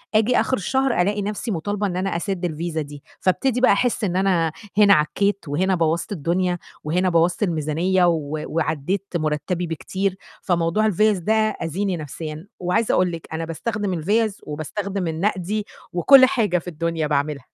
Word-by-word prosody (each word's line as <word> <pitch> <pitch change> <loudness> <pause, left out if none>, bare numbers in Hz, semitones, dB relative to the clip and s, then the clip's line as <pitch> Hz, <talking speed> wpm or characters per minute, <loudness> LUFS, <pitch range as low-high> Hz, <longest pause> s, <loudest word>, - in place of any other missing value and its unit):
آجي 225 +3 +4
آخر 260 - +1
الشهر 265 +2 +1
ألاقي 205 +3 0
نفْسي 210 +3 -3
مطالبة 205 +4 -1
إن 180 -2 -3
أنا 190 0 -1
أسد 180 +1 -2
الفيزا 165 0 -3
دي، 145 -1 -9 0.2
فابتدي 245 +6 +1
بقى 255 - +6
أحس 230 +2 +1
إن 180 -3 0
أنا 180 -4 +2 0.3
هنا 205 -1 +7
عكّيت 200 +5 +1
وهنا 185 +7 +1
بوَّظت 165 +1 0
الدنيا، 180 +1 0 0.3
وهنا 180 +5 +1
بوَّظت 170 +4 +2
الميزانية، 170 +2 +1
و 155 -3 -1
وعدِّيت 160 +3 -1
مرتّبي 155 +2 -1
بكتير، 190 +4 -2 0.3
فموضوع 175 +4 +1
الفِيَز 215 0 +3
ده 210 +6 +1
آذيني 200 -4 0
نفْسيًا، 155 +2 -7
وعايزة 185 +5 +1
أقول 180 -1 +2
لكِ 165 -1 -7
أنا 165 +1 -3
باستخدم 200 +5 -3
الفِيَز 205 +5 0
وباستخدم 185 +5 -4
النقدي، 190 +5 -1 0.3
وكلّ 260 +10 +7
حاجة 230 -9 +1
في 170 - -15
الدنيا 165 -1 -2
باعملها. 145 -2 -1
180 Hz, 155 wpm, -22 LUFS, 165-205 Hz, 0.3 s, هنا